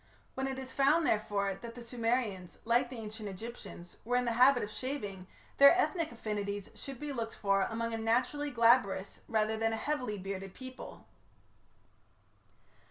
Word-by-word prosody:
When 265 0 -2
it 265 -1 -3
is 260 0 -7
found, 295 +4 +4
therefore, 205 -3 +1
that 230 +4 -9
the 245 - -8
Sumerians, 230 -6 -1
like 240 +2 +3
the 255 - -7
Ancient 215 -1 -6
Egyptians, 195 -3 -9
were 245 +3 0
in 250 0 +2
the 235 - +1
habit 250 +2 +5
of 210 - -5
shaving, 205 -9 -5 0.3
their 280 +4 +9
ethnic 335 -5 +1
affinities 205 -3 -4
should 270 -3 -8
be 295 -1 -4
looked 230 -3 -4
for 195 -1 +2
among 230 0 -2
a 225 - -2
naturally 250 +6 +1
glabrous 230 -6 +3
rather 220 -1 +1
than 225 0 +1
a - - -1
heavily 250 -5 -2
bearded 195 0 -6
people. 260 0 -9
230 Hz, 165 wpm, -32 LUFS, 205-255 Hz, 0.3 s, their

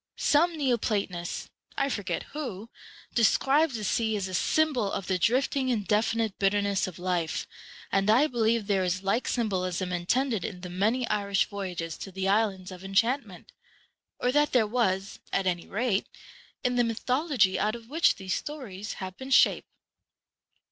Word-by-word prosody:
Some 330 +3 +3
neo 265 -5 +2
platonist, 195 -6 -3 0.3
I 275 - +2
forget 205 -8 -2
who, 235 -8 -5 0.4
describes 270 +5 +3
the 215 - -4
sea 220 +2 0
as 195 -2 -2
a 185 - -7
symbol 255 - +1
of 195 - -3
the 185 -1 0
drifting 260 +6 +1
indefinite 220 -1 0
bitterness 200 0 +1
of 185 - -8
life, 175 -3 -1 0.5
and 195 +1 +2
I 245 +7 +6
believe 230 -5 +1
there 195 -2 +1
is 185 +1 -1
like 200 +6 0
symbolism 185 -5 -1
intended 220 +4 0
in 180 -3 -5
the 180 -1 -7
many 220 +7 +1
Irish 200 -1 +1
voyages 180 -5 -5
to 195 - -7
the 190 +1 -2
islands 195 -2 +1
of 185 0 -10
enchantment, 210 +1 -1 0.7
or 250 - +1
that 295 +2 +2
there 245 -4 +4
was, 200 -4 -1
at 195 - 0
any 175 -2 -1
rate, 210 -2 0 0.6
in 250 -1 +1
the 245 - +4
mythology 235 - +1
out 215 +2 +1
of 230 -1 -11
which 320 +6 +3
these 190 -2 -4
stories 220 -9 -5
have 185 -1 -7
been 265 0 -8
shaped. 270 - +4
210 Hz, 160 wpm, -28 LUFS, 190-250 Hz, 0.7 s, I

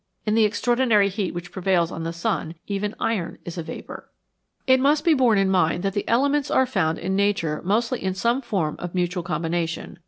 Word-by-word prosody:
In 210 - +1
the 225 0 +4
extraordinary 230 -1 +2
heat 195 -1 -2
which 175 0 -7
prevails 180 -3 +1
on 165 - -5
the 165 - -2
sun 170 -2 -2
even 205 +1 -3
iron 180 -7 -2
is 175 0 -6
a - - -1
vapour. 160 - -9 0.6
It 260 -1 +5
must 295 +4 +2
be 335 - +5
borne 250 -7 +3
in 195 -1 +2
mind 175 -1 +2
that 195 -1 -1
the 205 - -3
elements 280 +4 +2
are 260 - +3
found 180 -10 0
in 190 +2 -2
nature 195 -6 0
mostly 230 +6 0
in 190 -1 -1
some 235 +6 +1
form 190 - -2
of 175 0 -6
mutual 180 0 0
combination. 170 0 -3
195 Hz, 200 wpm, -23 LUFS, 175-230 Hz, 0.6 s, It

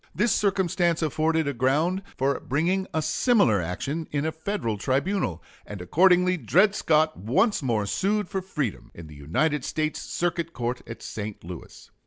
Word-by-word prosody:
This 210 +8 +2
circumstance 180 -4 +1
afforded 160 +1 +1
a 140 - -1
ground 150 +9 +1 0.2
for 135 +1 +1
bringing 175 +8 0
a 160 - -1
similar 180 - +3
action 140 - -4
in 145 0 -1
a 160 - 0
Federal 160 - -3
tribunal, 135 - -1 0.2
and 105 - -8
accordingly 180 - +4
Dred 195 +5 +3
Scott 155 -5 +2
once 185 - +1
more 115 -6 0
sued 195 - 0
for 190 - -3
freedom, 150 - -4
in 85 - -9
the 75 - -12
United 130 - 0
States 155 0 -2
Circuit 170 -1 -2
Court 120 +1 -3
at 115 0 -9
St. 105 -1 -6
Louis. 85 -1 -10
155 Hz, 160 wpm, -25 LUFS, 120-180 Hz, 0.2 s, accordingly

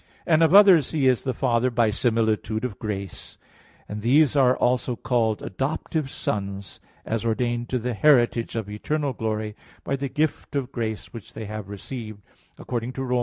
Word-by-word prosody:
And 160 -1 +3
of 165 +3 +5
others 190 -8 +7
He 145 -5 +1
is 125 -2 +3
the 130 - -2
Father 125 -1 +1
by 115 -2 +2
similitude 110 0 0
of 120 -5 -6
grace, 100 -4 -6 0.5
and 105 0 -6
these 140 +6 +4
are 130 -2 +4
also 125 0 +1
called 115 -3 0
adoptive 140 - -2
sons, 100 -5 -4 0.3
as 115 0 -2
ordained 120 +1 -1
to 130 - 0
the 125 +1 -2
heritage 120 -3 +3
of 110 -3 -3
eternal 140 +7 -2
glory 110 -2 -3 0.3
by 140 - -1
the 140 0 -3
gift 150 +1 -2
of 135 -2 -2
grace 110 -3 -4
which 115 -4 -10
they 110 - -6
have 105 -1 -6
received, 110 0 -7 0.3
according 120 +1 -4
to 135 - -4
Rom. 125 -1 0
120 Hz, 170 wpm, -24 LUFS, 110-135 Hz, 0.5 s, others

